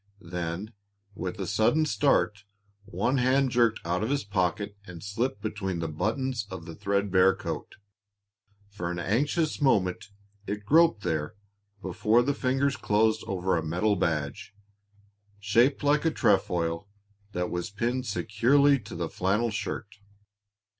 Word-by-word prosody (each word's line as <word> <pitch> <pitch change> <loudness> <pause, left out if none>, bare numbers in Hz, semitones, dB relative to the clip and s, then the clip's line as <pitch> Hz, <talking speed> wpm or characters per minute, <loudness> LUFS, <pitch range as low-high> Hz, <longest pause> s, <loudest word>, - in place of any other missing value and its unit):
Then, 90 +5 -4 0.4
with 95 +2 -5
a 95 - -2
sudden 110 - +2
start, 135 -9 +1 0.4
one 105 +8 0
hand 130 +1 +3
jerked 120 -2 +2
out 90 +3 0
of 110 - -1
his 140 0 0
pocket 100 +1 -1
and 90 -2 -9
slipped 105 +2 -2
between 95 -3 -3
the 85 -1 -2
buttons 115 - -2
of 95 -4 -7
the 85 - -8
thread 100 +2 -1
bare 95 0 +5
coat. - - -6 0.9
For 100 -4 -5
an 90 - -3
anxious 145 - 0
moment 95 -8 +1 0.4
it 105 0 -4
groped 160 - +4
there 80 -2 -2 0.5
before 105 +6 +2
the 145 +3 +1
fingers 135 +1 0
closed 110 0 +2
over 95 -1 0
a 80 - -1
metal 90 +7 +1
badge, 85 +5 -2 0.8
shaped 115 +8 +2
like 145 +1 +3
a 165 - +3
trefoil, 85 - +1 0.5
that 90 0 -2
was 90 +4 -3
pinned 120 +5 -2
securely 130 +7 +3
to - - -10
the 85 0 -2
flannel 105 +8 0
shirt. 105 0 -5
105 Hz, 140 wpm, -27 LUFS, 90-125 Hz, 0.9 s, bare